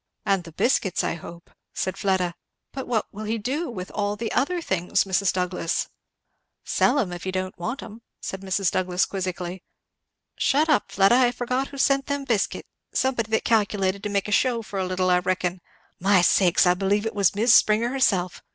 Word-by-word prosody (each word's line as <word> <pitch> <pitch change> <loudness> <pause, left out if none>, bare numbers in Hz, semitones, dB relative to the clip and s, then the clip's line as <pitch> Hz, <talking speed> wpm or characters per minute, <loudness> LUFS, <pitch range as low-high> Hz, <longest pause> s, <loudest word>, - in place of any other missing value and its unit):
"And 195 -3 +1
the 165 - -10
biscuits, 190 +1 +1
I - - 0
hope," 170 0 -11 0.2
said 185 - -2
Fleda. 185 -3 0 0.4
"But 265 -1 -6
what 225 -4 0
will 215 +2 -6
he 225 +2 -1
do 275 +10 -2
with 185 -6 -7
all 205 0 -1
the 225 +1 -4
other 350 +6 0
things, 190 - 0
Mrs. 190 0 +1
Douglass?" 180 -2 -2 0.7
"Sell - - +2
'em 195 -10 0
if 175 - -7
he 190 - -3
don't 185 0 -3
want 205 +10 -4
'em," 225 +1 -11 0.2
said 190 - -6
Mrs. 190 -1 0
Douglass 180 0 +1
quizzically. 185 -1 -4 0.7
"Shut 300 +4 +2
up, 295 - +2
Fleda, 195 +2 +4
I 250 -2 +4
forget 250 +2 -2
who 280 - -11
sent 275 0 +2
them 285 0 -2
biscuit 230 -7 -1 0.3
somebody 250 -4 0
that 220 - +1
calculated 200 -3 +1
to 210 - -3
make 200 0 -1
a - - -4
shew 235 +2 +2
for 200 -1 -5
a 185 - -1
little, 185 0 0
I 180 - +4
reckon. 180 0 -2 0.4
My 190 -1 +4
sakes! 180 0 +4
I 180 - +5
believe 200 +3 0
it 225 - -2
was 200 -1 +2
Mis' 225 +3 +4
Springer 215 +3 +4
herself! 195 -9 0
200 Hz, 195 wpm, -24 LUFS, 185-235 Hz, 0.7 s, I